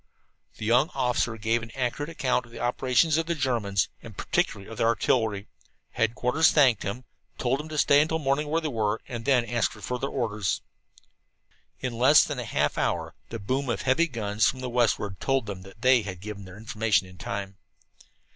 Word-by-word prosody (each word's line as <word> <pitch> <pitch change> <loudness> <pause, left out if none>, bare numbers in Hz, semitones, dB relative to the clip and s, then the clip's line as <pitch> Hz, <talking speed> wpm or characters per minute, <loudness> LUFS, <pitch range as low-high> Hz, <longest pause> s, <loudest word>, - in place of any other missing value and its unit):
The - - -5
young 125 +8 +4
officer 125 -3 0
gave 115 +2 0
an 110 - -8
accurate 135 +4 -2
account 130 -6 -1
of - - -19
the - - -10
operations 130 +5 +2
of 165 0 -1
the 170 - 0
Germans, 115 - 0
and - - -12
particularly 100 -1 -1
of 115 - -9
their 115 - +3
artillery. 110 -2 +1 0.4
Headquarters 125 +7 +2
thanked 130 -8 +4
them, 110 +6 -4 0.3
told 130 +2 0
them 155 +1 -7
to 155 - -5
stay 145 0 +5
until 160 +1 0
morning 145 0 0
where 160 +3 0
they 160 - -2
were, 110 -5 0
and 120 -2 -6
then 130 -4 +3
ask 120 -2 0
for 110 - -12
further 125 +6 -3
orders. 105 -7 -2 1.2
In 125 -2 -2
less 130 +6 +6
than 145 -4 -4
half 75 -11 -1
an - - +2
hour - - -2 0.2
the 115 - -4
boom 130 +6 -2
of 120 - -1
heavy 135 +6 +3
guns 110 -5 0
from 130 - -5
the 125 -1 -4
westward 105 -5 +1
told 135 -3 0
them 100 -3 -6
that 95 +5 -14
they 130 -1 +6
had 95 -4 -6
given 100 0 -7
their 95 +1 -11
information 110 -2 +1
in 95 0 -15
time. 100 -1 -5
120 Hz, 195 wpm, -27 LUFS, 105-135 Hz, 1.2 s, less